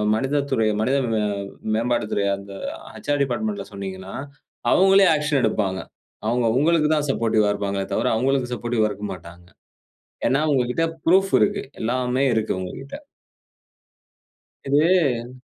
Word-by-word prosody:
மனித 135 +5 0
துறை, 115 -4 +2
மனித 130 +5 +2 0.2
மே 110 - +1 0.5
மேம்பாட்டு 115 -1 0
துறை 100 - +1
அந்த 100 0 -11 0.3
அ - - -14 0.2
"ஹெச். - - -9
ஆர் 145 - 0
டிபார்ட்மென்ட்ல" 205 - -2
சொன்னீங்கன்னா, 95 -1 -7 0.6
அவுங்களே 195 +1 +6
ஆக்க்ஷன் 150 -2 +1
எடுப்பாங்க. 100 -4 0 0.5
அவுங்க 120 +1 +1
உங்களுக்கு 155 +2 +3
தான் 150 -1 0
சப்போர்டிவ்வா 110 -4 +2
இருப்பாங்களே 100 -1 -2
தவிர, - - +1
அவுங்களுக்கு 130 +1 0
சப்போர்டிவ்வா 120 -2 0
இருக்க 105 0 -6
மாட்டாங்க. 85 0 -13 0.8
ஏன்னா 135 - +2
உங்ககிட்ட 125 +4 +1 0.2
புரூஃப் 190 +3 +4
இருக்கு. 205 0 +1 0.2
எல்லாமே 125 +3 0
இருக்கு 110 -1 0
உங்ககிட்ட. 130 +9 -7 1.7
இது. 140 -5 +2
125 Hz, 125 wpm, -23 LUFS, 105-145 Hz, 1.7 s, அவுங்களே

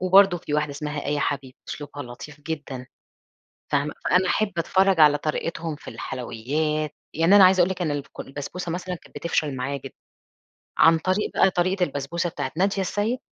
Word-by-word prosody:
وبرضو 185 0 +6
في 150 - -4
واحدة 150 -1 +1
اسمها 150 +1 -4
آية 145 +1 0
حبيب 140 -2 -2
أسلوبها 145 -1 -6
لطيف 140 +4 -10
جدًا. 145 -5 -5 0.8
فاهمة، 145 +1 +1
فأنا 185 0 +3
أحب 215 -1 +1
أتفرّج 190 +1 +3
على 150 -1 +7
طريقتهم 165 +1 -3
في - - -13
الحلويّات، 150 +5 -2 0.2
يعني 165 +6 +5
أنا 200 - +9
عايزة 185 0 +6
أقول 175 +1 +4
لِك 185 -1 -3
إن 160 - 0
الك 145 -1 -5
البسبوسة 150 +5 -5
مثلًا 180 +1 -3
كانت 175 - -15
بتفشل 155 -4 -1
معايا 130 +2 -2
جدًا، - - -8 0.8
عن 165 0 +6
طريق 185 +5 0
بقى 190 - +5
طريقة 185 +1 +1
البسبوسة 170 +3 -2
بتاعة - - -4
نادية 195 +2 +2
السيد 210 +6 -1
160 Hz, 170 wpm, -24 LUFS, 145-185 Hz, 0.8 s, أنا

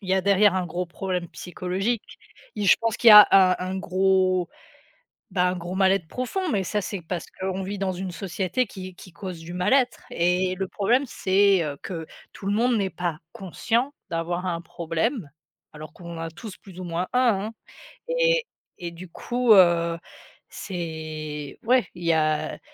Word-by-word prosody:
il 195 - -10
y 190 - +3
a 190 - +2
derrière 200 +1 +4
un 185 -1 0
gros 180 +1 -3
problème 180 -1 -4
psychologique 190 +5 -4 0.4
et 205 - -3
je 195 - +6
pense 230 -1 0
qu'il 235 - +5
y - - +11
a 210 -1 +11
un 185 -2 +6
un 185 +1 -3
gros, 185 -1 +1 0.8
ben, 180 -1 +2
un 180 - -1
gros 175 +1 -6
mal-être 190 -3 +2
profond 290 - -3
mais 200 -5 0
ça, 210 +3 -1
c'est 190 0 -5
parce 170 +1 -5
qu'on 190 0 -2
vit 200 +2 -4
dans 195 -1 -1
une 185 0 -5
société 190 +7 -2
qui 185 -3 -9
qui 185 - -13
cause 180 -1 -7
du 170 +2 -9
mal-être 240 +8 +1
et 180 +2 +1
le 190 0 -3
problème 240 +9 +1
c'est, 195 -5 +2
heu, 145 -2 -4
que 165 -4 -6 0.3
tout 195 - -8
le 200 - +1
monde 240 +3 +2
n'est 200 -3 0
pas 175 -4 -3
conscient 235 - -1 0.2
d'avoir 175 +2 -2
un 170 -2 -2
problème. 170 - -3 0.4
Alors 155 0 -10
qu'on 170 -1 -9
en - - -7
a 165 - -4
tous 210 +3 -10
plus 185 -2 -13
ou - - -5
moins 175 +2 -2
un, 235 -5 +2
hein - - -13 0.6
et - - +2 0.3
et 175 -2 -5
du 175 +2 -10
coup, 240 +6 +1
heu, 170 -3 +4 0.5
c'est 155 -5 -6
ouais 250 +1 +3
il 175 -1 -9
y 165 - +3
a 155 -1 0
185 Hz, 185 wpm, -25 LUFS, 170-205 Hz, 0.8 s, y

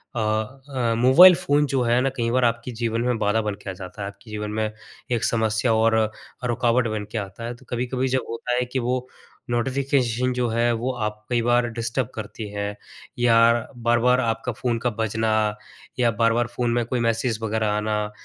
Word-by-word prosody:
अ - - -1
अ, 115 +3 -1
mobile 135 +10 +8
phone 145 -2 +1
जो 130 - +2
है 120 +1 +3
ना, 135 - +1
कई 115 -1 0
बार 125 0 +3
आपके 115 +1 -1
जीवन 115 -1 0
में 125 -1 0
बाधा 105 +2 +2
बन 105 -2 -3
के - - -6
आ 95 - -3
जाता 95 +3 -9
है, 100 - -3
आपके 100 +3 -12
जीवन 105 0 -4
में 110 0 -1 0.4
एक 120 -2 0
समस्या 110 +1 +1
और 110 0 +3 0.5
रुकावट 120 0 +2
बन 110 -1 -3
के - - -3
आता 100 +2 -6
है। 120 +1 -5
तो - - -19
कभी-कभी 125 +2 -1
जब - - -3
होता 115 +2 -2
है 125 0 +1
कि 130 - +1
वो 125 +1 -1 0.4
नोटिफ़िकेशन 125 0 0
जो 125 -1 0
है 115 +1 +2
वो 120 +3 -1
आप 105 0 -3
कई 120 -1 +2
बार 120 +1 +2
डिस्टर्ब 115 +1 -2
करती 110 0 -6
हैं 100 0 -4 0.4
या 120 -1 +4 0.4
बार-बार 120 +2 +3
आपका 115 +1 -1
फ़ोन 120 +1 -1
का 125 - 0
बजना 110 0 0 0.7
या 120 -2 +3
बार-बार 115 +1 +3
फ़ोन 120 -1 0
में 120 0 +1
कोई 125 +2 -2
मैसेज 115 0 0
वगैरह 110 0 0
आना, 105 0 -1
115 Hz, 195 wpm, -23 LUFS, 110-125 Hz, 0.7 s, mobile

